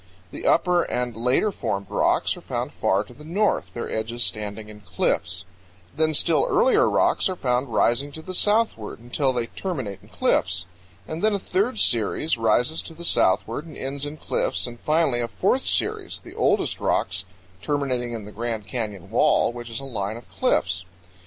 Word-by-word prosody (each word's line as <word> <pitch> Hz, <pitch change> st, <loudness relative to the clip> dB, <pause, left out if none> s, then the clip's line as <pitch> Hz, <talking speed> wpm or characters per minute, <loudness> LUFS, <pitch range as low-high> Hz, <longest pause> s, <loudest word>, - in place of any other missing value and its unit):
The -, -, -4 dB
upper 180 Hz, -1 st, +4 dB
and 125 Hz, -7 st, -2 dB
later 125 Hz, -, +2 dB
formed 100 Hz, -, -2 dB
rocks -, -, +2 dB
are -, -, -11 dB
found -, -, -3 dB
far 100 Hz, +2 st, +1 dB
to 115 Hz, -, -15 dB
the 150 Hz, -, -14 dB
north, 195 Hz, +7 st, 0 dB
their 120 Hz, -, -3 dB
edges 115 Hz, +2 st, -2 dB
standing 105 Hz, 0 st, -2 dB
in 105 Hz, 0 st, -11 dB
cliffs; 90 Hz, -1 st, -1 dB, 0.5 s
then 155 Hz, 0 st, +2 dB
still 175 Hz, -, +3 dB
earlier 470 Hz, -2 st, +4 dB
rocks -, -, +2 dB
are 185 Hz, -, -2 dB
found 125 Hz, -4 st, 0 dB
rising 125 Hz, +6 st, +2 dB
to 160 Hz, -, -7 dB
the 185 Hz, -, -6 dB
southward, 205 Hz, -, +1 dB
until 125 Hz, +4 st, 0 dB
they 120 Hz, -2 st, -1 dB
terminate 130 Hz, -, -4 dB
in -, -, -18 dB
cliffs; 90 Hz, -2 st, +1 dB, 0.4 s
and 160 Hz, +1 st, -4 dB
then 215 Hz, -1 st, +3 dB
a -, -, +2 dB
third 200 Hz, +5 st, 0 dB
series 120 Hz, +7 st, +2 dB
rises 120 Hz, +7 st, +2 dB
to 165 Hz, -, -10 dB
the 170 Hz, +1 st, -8 dB
southward 115 Hz, -, +1 dB
and 155 Hz, -, -10 dB
ends 135 Hz, +1 st, -3 dB
in 145 Hz, +1 st, -3 dB
cliffs, -, -, 0 dB
and 120 Hz, -1 st, -8 dB
finally 155 Hz, -5 st, +2 dB
a 120 Hz, -, -1 dB
fourth -, -, 0 dB
series, -, -, 0 dB
the -, -, -11 dB
oldest -, -, +1 dB
rocks, 95 Hz, +1 st, 0 dB, 0.4 s
terminating 130 Hz, -5 st, -1 dB
in 110 Hz, -3 st, -5 dB
the 105 Hz, -, -9 dB
Grand 115 Hz, -1 st, -3 dB
Canyon 105 Hz, -5 st, -5 dB
wall, 115 Hz, -, +4 dB
which 120 Hz, 0 st, -7 dB
is 115 Hz, -, -4 dB
a 135 Hz, -, -7 dB
line 110 Hz, -4 st, -3 dB
of 120 Hz, -, -13 dB
cliffs. 90 Hz, 0 st, +1 dB
120 Hz, 185 wpm, -24 LUFS, 110-155 Hz, 0.5 s, upper